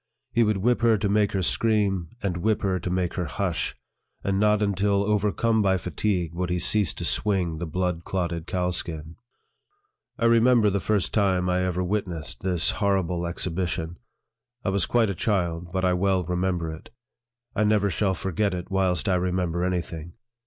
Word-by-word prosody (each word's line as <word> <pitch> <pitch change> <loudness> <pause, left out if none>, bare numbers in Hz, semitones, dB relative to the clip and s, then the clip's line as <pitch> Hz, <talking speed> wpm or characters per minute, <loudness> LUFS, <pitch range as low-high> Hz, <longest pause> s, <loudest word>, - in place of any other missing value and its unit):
He 120 - +2
would 105 -2 +3
whip 120 +5 +1
her 115 -2 +4
to 105 - -1
make 105 0 +2
her 95 -2 0
scream, 100 -4 +1
and 90 -3 -1
whip 110 +4 0
her 95 -2 +1
to 90 - -4
make 90 -1 -1
her 90 - -2
hush; 65 - -2 0.5
and 100 -1 0
not 105 0 +3
until 100 0 +1
overcome 105 +2 +1
by 95 -2 +3
fatigue, 90 -2 -1
would 90 +1 -2
he 90 - 0
cease 95 -1 +2
to - - -4
swing 90 -6 0
the 85 - -3
blood 90 +1 -2
clotted 85 -3 -3
cowskin. 85 -3 -3 1.0
I 115 - 0
remember 115 -2 +5
the 100 - 0
first 105 -2 0
time 95 -4 +2
I 90 0 +1
ever 90 0 -1
witnessed 90 -5 -3
this 90 -3 +1
horrible 90 -4 0
exhibition. 85 -1 -3 0.7
I - - +2
was 95 -2 +1
quite 115 -4 +2
a - - -2
child, 90 -3 -1
but 95 -1 0
I 90 - +3
well 95 0 +1
remember 90 -1 -1
it. 80 - -10 0.7
I 105 - +2
never 105 -2 +2
shall 95 -1 0
forget 95 +1 -1
it 90 +2 -6
whilst 95 -3 +1
I 95 - +3
remember 90 -1 0
any 90 -1 +1
thing. 85 -1 -9
95 Hz, 180 wpm, -25 LUFS, 90-105 Hz, 1.0 s, remember